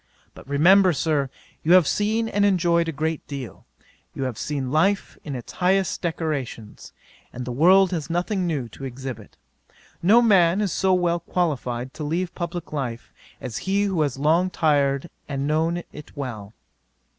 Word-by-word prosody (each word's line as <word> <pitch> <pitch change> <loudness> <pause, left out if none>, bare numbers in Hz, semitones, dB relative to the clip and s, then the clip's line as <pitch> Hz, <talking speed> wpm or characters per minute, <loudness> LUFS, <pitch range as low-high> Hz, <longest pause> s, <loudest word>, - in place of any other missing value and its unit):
But - - -14
remember, 180 +6 +5
Sir, 150 -3 0 0.3
you 165 - +3
have 185 -3 +7
seen 220 +2 0
and 205 -2 0
enjoyed 170 -4 +2
a - - -1
great 160 +1 -3
deal; 140 -4 -8 0.5
you - - -3
have 130 -3 -3
seen 135 +1 -3
life 195 +7 +1
in 145 -3 -5
its 120 - -7
highest 190 0 +1
decorations, 145 -10 -4 0.4
and 125 0 -6
the 125 - -4
world 185 +8 +5
has 165 -3 -3
nothing 180 +2 -1
new 145 -7 -2
to 135 - -12
exhibit. 130 -4 -7 0.6
No 205 +7 +6
man 195 -6 +4
is 205 -4 0
so 190 +3 +1
well 175 -1 +1
qualifyed 130 -8 -2
to 155 - -6
leave 170 +4 -2
publick 170 -2 -5
life 120 -5 -4 0.3
as 130 -4 -5
he 200 +1 +2
who 190 -5 0
has 145 -4 -1
long 165 +6 +2
tried 140 -5 +1
it 170 - -14 0.2
and 140 -1 -2
known 165 +3 0
it 150 0 -12
well. 110 -6 -6
160 Hz, 170 wpm, -23 LUFS, 135-180 Hz, 0.6 s, have